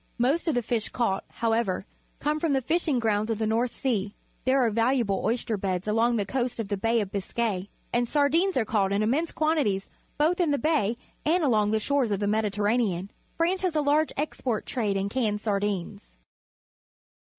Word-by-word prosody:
Most 270 +9 +1
of 315 - +2
the 245 - +1
fish 225 -2 -1
caught, 195 -6 -1
however, 225 -5 0 0.3
come 300 +2 0
from 315 -2 +1
the 270 - +2
fishing 315 0 +1
grounds 215 -2 +1
of 225 - 0
the 220 - -1
North 230 +3 +1
Sea. 215 -6 -2 0.3
There 260 0 +3
are 225 - +1
valu 235 +4 +2
able 200 -4 -1
oyster 225 -1 0
beds 190 -2 -2
alongTHe 225 -1 +1
coast 245 -1 -2
of 215 -3 -3
the 205 - 0
Bay 225 +3 +1
of 200 -2 -5
Biscay, 200 -1 -2 0.2
and 240 0 +1
sardings 315 +6 +2
are 235 - +2
caught 205 -3 +1
in 200 +2 +1
immense 290 +10 +1
quantities 295 -12 0 0.3
both 320 +5 +2
in 345 -3 +2
the 285 - +2
Bay 240 -6 +1 0.3
and 335 +3 +2
along 215 -7 +3
the 220 +1 +1
shores 275 +1 +1
of 200 -2 0
the 205 - 0
Mediterranean. 210 -2 0 0.3
France 355 +3 +1
has 365 -4 -1
a 305 - +3
large 295 +2 +2
export 260 -6 -2
trade 210 -6 -1
in 195 0 -1
canned 210 -2 0
sardines. 200 - -3
230 Hz, 190 wpm, -27 LUFS, 205-280 Hz, 0.3 s, There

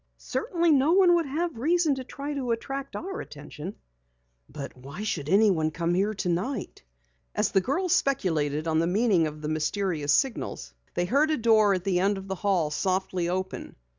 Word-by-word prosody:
Certainly 345 -7 0
no 290 +3 +4
one 370 -2 +6
would 340 -3 +2
have 315 -1 -2
reason 325 +2 +2
to 265 -1 -4
try 285 +3 -6
to 265 -4 -3
attract 270 +4 -3
our 385 +3 -5
attention." 150 +5 -8 0.7
"But 140 -2 -7
why 140 +10 -8
should 150 -9 -3
anyone 190 -5 +4
come 170 +2 -1
here 200 +4 +1
tonight?" 195 +6 -2 0.5
As 210 -1 +1
the 195 - +3
girls 340 - 0
speculated 160 - 0
upon 160 -1 +1
the 165 - +1
meaning 190 -3 +3
of 150 0 -8
the - - -2
mysterious 155 0 -1
signals, 175 - -1 0.2
they 175 - +1
heard 285 - +2
a 310 - +1
door 220 -4 +4
at 180 - -4
the 185 -2 +1
end 200 +2 +2
of 195 0 -8
the 190 - -2
hall 185 -5 0
softly 185 0 -1
open. 185 +1 -4
195 Hz, 180 wpm, -27 LUFS, 170-275 Hz, 0.7 s, one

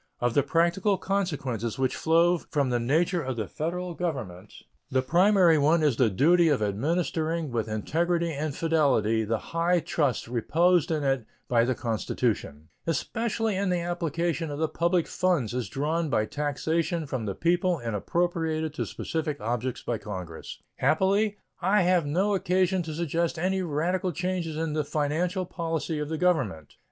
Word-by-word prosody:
Of 120 -1 +1
the 145 - +4
practical 170 +7 +2
consequences 140 - -2
which 130 -1 0
flow 170 +2 +3
from 140 -5 -1
the 120 - +1
nature 165 +9 +1
of 130 -3 -3
the 110 -4 -3
Federal 175 - -3
Government, 120 - -4 0.4
the 130 0 +1
primary 175 +1 +4
one 155 +3 +3
is 145 -5 +3
the 125 -4 +4
duty 165 - +4
of 145 - +2
administering 155 - -1
with 115 -2 -1
integrity 165 +10 0
and 145 0 -3
fidelity 135 -9 +2
the 110 +1 0
high 170 +7 0
trust 150 -7 -1
reposed 165 +8 +2
in 155 -3 0
it 135 -4 0 0.2
by 115 -1 +3
the 130 0 0
Constitution, 80 - -2 0.2
especially 220 - -1
in 195 0 0
the 180 -1 +1
application 170 -1 -2
of 145 - -4
the 160 +1 +1
public 170 +1 +1
funds 170 -12 0
as 125 -6 -3
drawn 155 +5 -1
by 110 -5 +1
taxation 160 +5 -1
from 130 -6 -4
the 100 - -3
people 175 - +1
and 115 -6 -4
appropriated 160 - -1
to 155 - -3
specific 155 -3 -3
objects 120 +3 -3
by 115 -3 -2
Congress. 90 -6 -7
Happily, 200 +5 +2 0.2
I 200 0 +3
have 175 -4 +2
no 190 +8 +1
occasion 185 0 +1
to 160 -2 -5
suggest 170 +1 -1
any 190 +3 0
radical 180 +3 -1
changes 175 -2 -2
in 160 -1 -2
the 155 0 0
financial 160 +6 -1
policy 165 -2 -3
of 150 0 -3
the 160 - -2
Government. 130 - 0
160 Hz, 165 wpm, -27 LUFS, 130-175 Hz, 0.4 s, the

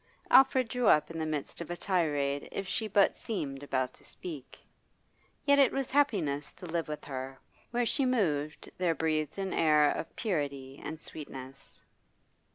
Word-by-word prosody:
Alfred 260 -2 +6
drew 245 0 0
up 150 +2 +5
in 165 - -5
the 160 - -1
midst 155 +1 -3
of 170 - -6
a 175 - -3
tirade 145 -7 0
if 195 - -4
she 220 +3 -1
but 200 -1 +4
seemed 140 -11 -4
about 130 -2 -1
to - - -19
speak. 150 -7 -8 0.9
Yet 285 0 +5
it 270 -3 +6
was 270 -2 -2
happiness 180 - +1
to - - -11
live 170 -1 -2
with 150 0 -6
her; 130 -1 -6 0.3
where 240 0 +1
she 270 +3 +2
moved 155 - 0
there 175 -3 +2
breathed 155 -1 -1
an 195 -1 -2
air 150 -2 +4
of - - -5
purity 140 - -3
and 160 0 -5
sweetness. 135 -4 -8
160 Hz, 165 wpm, -31 LUFS, 145-200 Hz, 0.9 s, Alfred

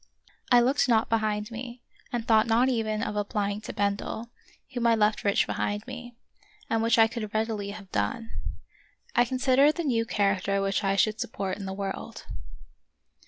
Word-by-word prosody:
I 245 -1 +7
looked 260 +2 +2
not 225 -1 +3
behind 215 -1 0
me, 240 +1 -7 0.3
and 235 -2 -2
thought 220 0 +5
not 235 +3 +4
even 220 -3 0
of 210 - -3
applying 205 0 -1
to - - -6
Bendel, 205 +3 -2 0.4
whom 240 -1 +1
I 230 - +5
left 215 -1 +2
rich 200 -1 +3
behind 205 +1 -2
me, 245 -2 -8 0.6
and 225 0 +2
which 230 0 +3
I 225 - +8
could 225 -2 -4
readily 215 -2 -1
have 200 -2 -9
done. 110 - -2 0.8
I 245 - +5
considered 260 +4 +3
the 340 - -2
new 240 -6 +1
charac 200 -4 0
ter 200 0 +1
which 195 0 0
I 195 0 +2
should 215 +2 +2
support 195 -4 -3
in 195 - -5
the - - -3
world. 195 0 -5
220 Hz, 175 wpm, -27 LUFS, 205-235 Hz, 0.8 s, I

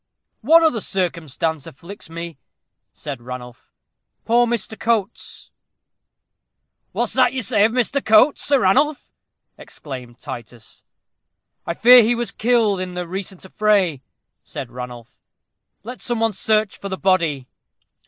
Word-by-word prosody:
"One 325 +8 +6
other 245 -9 +2
circumstance 165 -5 -2
afflicts 170 +6 -11
me," 170 -3 -7 0.5
said 140 -5 -7
Ranulph. 125 0 -10 0.5
"Poor 240 +1 +3
Mr. 230 -2 -1
Coates!" 225 -2 -2 1.4
"What's - - -1
that - - +3
you 260 -2 -2
say 215 -3 +3
of 225 - +1
Mr. 255 +3 0
Coates, 220 +7 +4
Sir 280 -2 +2
Ranulph?" 275 +10 +2 0.5
exclaimed 125 -4 -9
Titus. 120 -1 -10 0.8
"I 170 - -2
fear 245 +4 +8
he 235 +2 +2
was 240 0 -2
killed 225 -4 +1
in 185 -1 -5
the 180 -1 -4
recent 190 +1 -6
affray," 190 -7 +1 0.4
said 120 - -7
Ranulph. 125 -1 -9 0.6
"Let 245 +4 -8
some 240 -2 -2
one 225 -1 +1
search 215 +1 0
for 200 - -6
the 190 - -4
body." 165 -9 +1
195 Hz, 130 wpm, -21 LUFS, 155-230 Hz, 1.4 s, fear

